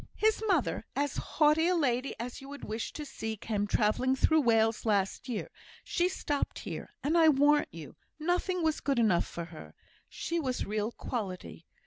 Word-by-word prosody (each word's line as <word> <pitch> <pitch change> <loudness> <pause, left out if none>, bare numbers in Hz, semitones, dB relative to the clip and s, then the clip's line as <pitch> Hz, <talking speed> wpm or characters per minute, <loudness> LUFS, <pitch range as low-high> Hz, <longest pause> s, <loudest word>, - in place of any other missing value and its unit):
His 435 0 +2
mother, 340 - +1
as 285 +1 0
haughty 310 +2 +3
a 365 - +3
lady 260 -5 0
as 245 +4 -5
you 270 - -10
would 285 0 -9
wish 220 +1 -4
to 300 - -6
see, 220 -5 -5
came 205 0 -2
travelling 230 +6 +2
through 315 +4 +4
Wales 225 -3 +3
last 205 +3 0
year; 225 -4 -3 0.3
she 350 0 +1
stopped 290 -6 -2
here, - - -6
and, 305 +4 +1
I 325 -2 +7
warrant 295 +1 +4
you, 160 -3 -10 0.2
nothing 355 +2 0
was 315 -1 +1
good 275 -2 0
enough 210 -7 +3
for 170 - -5
her; 160 -2 -12 0.3
she 340 0 -2
was 260 -5 -2
real 215 +2 -1
quality. 190 -9 -5
260 Hz, 175 wpm, -30 LUFS, 215-310 Hz, 0.3 s, I